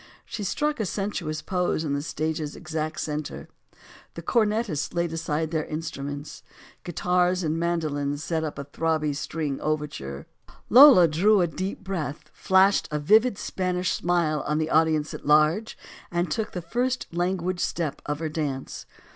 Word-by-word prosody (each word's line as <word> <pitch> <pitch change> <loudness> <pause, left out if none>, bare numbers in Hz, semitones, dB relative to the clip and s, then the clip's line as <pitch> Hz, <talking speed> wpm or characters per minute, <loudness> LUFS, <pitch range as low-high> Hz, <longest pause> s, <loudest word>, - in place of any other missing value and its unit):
She 210 - -5
struck 295 +9 -1
a 215 - 0
sensuous 180 -6 -3
pose 180 -3 0
in 145 -3 -1
the 140 - -1
stage's 155 0 -3
exact 155 -1 -4
center. 150 -1 -4 0.7
The - - -7
cornetists 210 - 0
laid 170 -1 0
aside 160 -1 -2
their 160 -2 0
instruments. 145 -2 -6 0.4
Guitars 180 +1 +1
and 160 0 -1
mandolins 155 -4 -1
set 160 -2 -1
up 155 -3 -4
a 140 - -5
throbby 155 0 -1
string 150 -1 -3
overture. 145 - -3 0.5
Lola 250 - +9
drew 190 +6 +3
a - - +4
deep 185 +4 -4
breath, 155 -5 -5
flashed 190 +1 +3
a 150 - -1
vivid 210 +9 +4
Spanish 180 -1 -1
smile 170 -4 +1
on 150 - +1
the 155 0 -1
audience 155 -1 +2
at - - -8
large, 155 +9 +3 0.3
and 175 -1 -1
took 220 +6 -2
the 180 - -4
first 245 +8 -1
languid 180 +1 -1
step 165 -5 -2
of 145 0 -1
her 160 +1 -3
dance. 145 -4 -4
160 Hz, 155 wpm, -25 LUFS, 150-185 Hz, 0.7 s, Lola